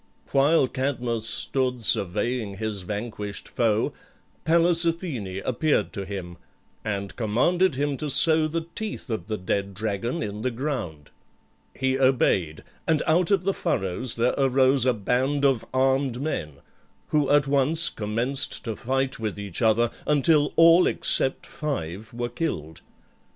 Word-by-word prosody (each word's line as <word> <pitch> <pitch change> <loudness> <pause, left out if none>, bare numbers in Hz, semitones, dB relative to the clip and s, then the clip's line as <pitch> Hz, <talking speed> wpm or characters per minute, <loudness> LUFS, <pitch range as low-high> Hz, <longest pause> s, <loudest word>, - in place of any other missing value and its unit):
While 140 +1 +4
Cadmus 125 -4 -2
stood 125 0 0
surveying 105 +1 +1
his 110 -2 -3
vanquished 105 +1 -5
foe 110 -2 0 0.5
Pallas 170 +1 +4
Athene 140 - -3
appeared 140 +4 0
to 100 -3 -4
him, 95 -3 -7 0.5
and 100 -2 -4
commanded 130 - +1
him 145 0 -1
to 150 - -3
sow 155 +3 +4
the 165 +1 -3
teeth 215 - -5
of 100 -5 -4
the 110 -1 -2
dead 100 +1 -2
dragon 110 - -2
in 105 0 -5
the 130 - 0
ground. 115 - -5 0.6
He 130 0 0
obeyed; 100 -12 +1 0.2
and 160 -2 +2
out 165 +2 +2
of 195 -3 +2
the 195 +1 +1
furrows 115 - -1
there 120 +2 +1
arose 130 0 +3
a 125 - +4
band 130 +7 0
of 135 -5 +2
armed 130 -1 +1
men, 130 - -3 0.6
who 150 -2 +1
at 145 -1 +4
once 145 +4 +4
commenced 115 +6 -1
to 115 -3 -4
fight 135 +3 -2
with 110 -3 -3
each 100 -4 -5
other, 115 +1 +3 0.2
until 150 0 +3
all 165 +2 +6
except 135 - +1
five 110 - -5
were 120 +1 -3
killed. 100 - -4
125 Hz, 140 wpm, -25 LUFS, 105-145 Hz, 0.6 s, all